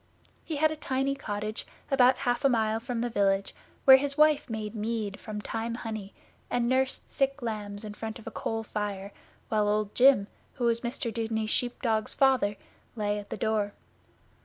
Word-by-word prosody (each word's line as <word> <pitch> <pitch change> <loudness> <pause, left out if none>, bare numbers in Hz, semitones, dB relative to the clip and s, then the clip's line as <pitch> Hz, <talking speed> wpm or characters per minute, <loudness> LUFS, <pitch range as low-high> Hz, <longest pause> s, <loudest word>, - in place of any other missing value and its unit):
He 320 - -4
had 310 +2 +3
a - - -3
tiny 270 -2 -1
cottage 215 -5 -4 0.2
about 255 -1 +6
half 245 0 +1
a 275 - +5
mile 220 -2 +1
from 235 0 -3
the 240 - 0
village, 195 -2 +1 0.3
where 265 -1 +11
his 280 +1 -2
wife 305 -2 +4
made 220 -1 -4
mead 215 -2 -3
from 215 -1 -6
thyme 225 +2 -3
honey, 220 -4 -6 0.3
and 240 -1 +1
nursed 260 +1 0
sick 275 +1 0
lambs 210 -2 -4
in 210 -1 -6
front 220 +1 -6
of 225 - -14
a - - -6
coal 225 0 -3
fire, 205 -2 -4 0.4
while 210 -1 +2
Old 210 -1 0
Jim, 255 -5 +6 0.3
who 255 - -5
was 235 0 +2
Mr 235 -1 -3
Dudeney's 220 -1 -1
sheep 245 +1 -1
dog's 220 -3 0
father, 260 -7 +3 0.4
lay 210 -2 -1
at 205 - -10
the - - -4
door. 210 -1 0
225 Hz, 185 wpm, -28 LUFS, 210-255 Hz, 0.4 s, where